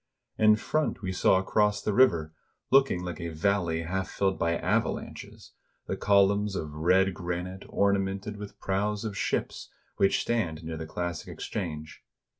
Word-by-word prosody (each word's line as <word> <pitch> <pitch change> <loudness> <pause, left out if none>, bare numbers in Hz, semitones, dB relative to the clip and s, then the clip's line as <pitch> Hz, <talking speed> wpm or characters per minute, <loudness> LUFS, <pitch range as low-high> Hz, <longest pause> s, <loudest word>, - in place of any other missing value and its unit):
In 110 -1 +6
front 155 +2 -1
we 95 - -2
saw 95 0 +3
across 105 +2 +1
the 105 - -2
river, 85 -11 +3 0.4
looking 135 -9 +4
like 90 -2 -5
a 85 - -3
valley 85 0 0
half 95 +3 -3
filled 95 -1 0
by 85 0 +1
avalanches, - - -3 0.3
the - - -2
columns 100 0 +3
of 75 -5 -4
red 90 +5 +3
granite 90 +1 -5
ornamented 100 +1 0
with 105 -1 -9
prows 105 +2 -1
of 105 -2 -4
ships, - - -2 0.3
which 95 - +3
stand 85 -9 -1
near 80 0 -5
the 80 0 -6
classic 85 0 -4
exchange. 80 -6 -6
95 Hz, 150 wpm, -28 LUFS, 85-105 Hz, 0.4 s, In